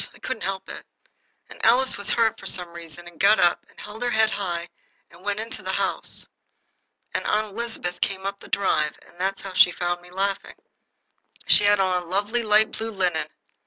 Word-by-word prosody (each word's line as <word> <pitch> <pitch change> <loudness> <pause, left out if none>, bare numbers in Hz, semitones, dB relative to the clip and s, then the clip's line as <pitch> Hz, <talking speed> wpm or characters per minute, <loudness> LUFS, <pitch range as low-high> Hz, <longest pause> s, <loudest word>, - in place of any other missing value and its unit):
I - - -14
couldn't 260 - -5
help 195 0 -3
it. - - -8 0.6
And - - -12
Alice 255 +3 +4
was 205 - -2
hurt, 225 -1 +2
for - - -8
some 180 -2 -1
reason, 170 0 -9
and 170 -2 -14
got 205 +2 +5
up 175 - +3
and - - -18
held 210 +2 -9
her 245 - +1
head 220 -1 +3
high 175 -4 -3 0.4
and 170 +2 -17
went 205 +1 -1
into 225 +1 -5
the - - -3
house. - - -3 0.9
And - - -1
Aunt 215 0 +1
Elizabeth 215 -5 -4
came 195 -1 -1
up 200 0 -3
the - - -13
drive, 155 -6 +1
and 175 - -21
that 195 +1 -1
is - - -11
how 195 - -6
she 180 -1 +7
found 175 0 -2
me 180 - -15
laughing. 195 +2 -2 0.9
She 210 - +6
had 205 0 +5
on 185 -2 +2
a - - -11
lovely 205 +6 0
light 215 0 +4
blue 225 0 -3
linen. 180 -7 0
195 Hz, 205 wpm, -24 LUFS, 180-215 Hz, 0.9 s, she